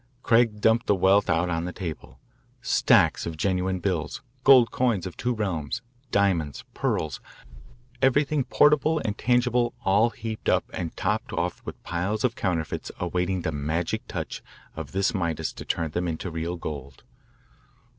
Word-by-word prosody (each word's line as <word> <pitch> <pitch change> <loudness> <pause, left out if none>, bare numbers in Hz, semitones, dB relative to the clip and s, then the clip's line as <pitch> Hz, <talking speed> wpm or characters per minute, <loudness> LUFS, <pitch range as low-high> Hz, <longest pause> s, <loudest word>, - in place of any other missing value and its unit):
Craig 115 -2 +3
dumped 110 +2 +3
the 100 - +4
wealth 95 +2 +3
out 80 +2 +2
on 85 0 -1
the 90 - -3
table 85 -4 -7 0.4
stacks - - +3
of 80 -1 -5
genuine 95 +1 0
bills, 85 -3 -2 0.2
gold 130 -4 +7
coins 115 -8 +1
of 90 - -6
two 125 - -1
realms, 100 - -2 0.3
diamonds, 90 -8 +1
pearls, 75 -5 -2 0.8
everything 140 +2 +3
portable 150 +4 +3
and 105 - -1
tangible 120 0 +2
all 100 +5 +4
heaped 115 -1 -4
up - - +2
and 85 -3 -5
topped 105 +3 -1
off 85 0 -2
with - - -8
piles 95 +7 -2
of 125 -2 +2
counterfeits 85 -5 -2
awaiting 90 +1 -1
the 80 - -1
magic 80 +4 -2
touch - - -5 0.3
of 80 -3 -6
this 95 +3 +1
Midas 85 -6 -2
to - - -9
turn 80 -2 -1
them 90 +3 -1
into 85 +2 -4
real 85 +2 -3
gold. 70 -5 -7
95 Hz, 155 wpm, -26 LUFS, 85-115 Hz, 0.8 s, gold